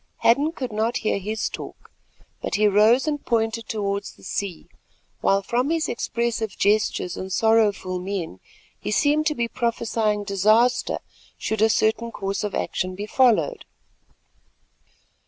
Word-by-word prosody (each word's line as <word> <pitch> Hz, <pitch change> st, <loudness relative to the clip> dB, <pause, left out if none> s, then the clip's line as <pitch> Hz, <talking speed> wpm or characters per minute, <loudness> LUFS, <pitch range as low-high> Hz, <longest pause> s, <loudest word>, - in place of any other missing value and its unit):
Hadden 285 Hz, +7 st, +4 dB
could 255 Hz, -7 st, -5 dB
not 220 Hz, +3 st, 0 dB
hear 205 Hz, -, +1 dB
his 215 Hz, +3 st, -2 dB
talk, -, -, -9 dB, 0.5 s
but -, -, -2 dB
he 210 Hz, +1 st, +4 dB
rose 220 Hz, +7 st, +4 dB
and 295 Hz, -2 st, -1 dB
pointed 225 Hz, -1 st, -1 dB
towards 200 Hz, -2 st, -2 dB
the -, -, -20 dB
sea, 190 Hz, -3 st, -4 dB, 0.5 s
while 195 Hz, 0 st, +2 dB
from 245 Hz, +7 st, 0 dB
his 325 Hz, -1 st, 0 dB
expressive 230 Hz, -3 st, -2 dB
gestures 205 Hz, -3 st, +1 dB
and 190 Hz, 0 st, -6 dB
sorrowful 205 Hz, -4 st, +2 dB
mien, 180 Hz, -, -4 dB, 0.4 s
he -, -, -5 dB
seemed 295 Hz, +7 st, +2 dB
to 305 Hz, -, 0 dB
be 235 Hz, -3 st, 0 dB
prophesying 225 Hz, -3 st, -1 dB
disaster 215 Hz, +5 st, +2 dB, 0.4 s
should 220 Hz, -1 st, -2 dB
a 220 Hz, -, +5 dB
certain 220 Hz, +2 st, +1 dB
course 195 Hz, -1 st, -3 dB
of 210 Hz, -, -3 dB
action 185 Hz, 0 st, -2 dB
be 205 Hz, +2 st, -5 dB
followed. 255 Hz, -, +2 dB
220 Hz, 140 wpm, -23 LUFS, 200-235 Hz, 0.5 s, a